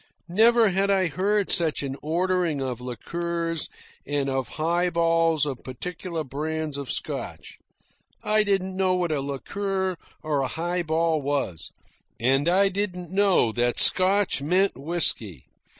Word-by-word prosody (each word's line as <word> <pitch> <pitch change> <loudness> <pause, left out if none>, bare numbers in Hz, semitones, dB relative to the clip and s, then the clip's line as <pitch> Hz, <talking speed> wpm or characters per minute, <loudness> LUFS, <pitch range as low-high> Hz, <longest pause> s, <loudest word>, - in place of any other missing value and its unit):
Never 225 +4 +5
had 195 +2 +1
I 190 -3 +2
heard 200 +6 0
such 160 -5 +2
an 135 -1 -4
ordering 175 -1 0
of 125 -3 -4
liqueurs 165 +7 -3 0.4
and 140 -1 0
of 130 -3 -2
highballs 165 -1 +2
of 135 -4 -5
particular 165 +5 -5
brands 155 +2 -3
of 140 -2 -5
Scotch. - - -4 0.6
I 215 0 +3
didn't 190 -2 0
know 185 -1 +2
what 175 -2 -1
a 145 -3 0
liqueur 190 +7 -3 0.3
or 150 -3 0
a 135 - 0
highball 165 -1 -1
was, 140 - -2 0.5
and 135 +6 +2
I 195 +3 +4
didn't 180 -3 -3
know 190 - +3
that 120 +1 0
"Scotch" 190 -3 +3
meant 185 +7 +2
whisky. 135 - -1
165 Hz, 135 wpm, -25 LUFS, 140-185 Hz, 0.6 s, Never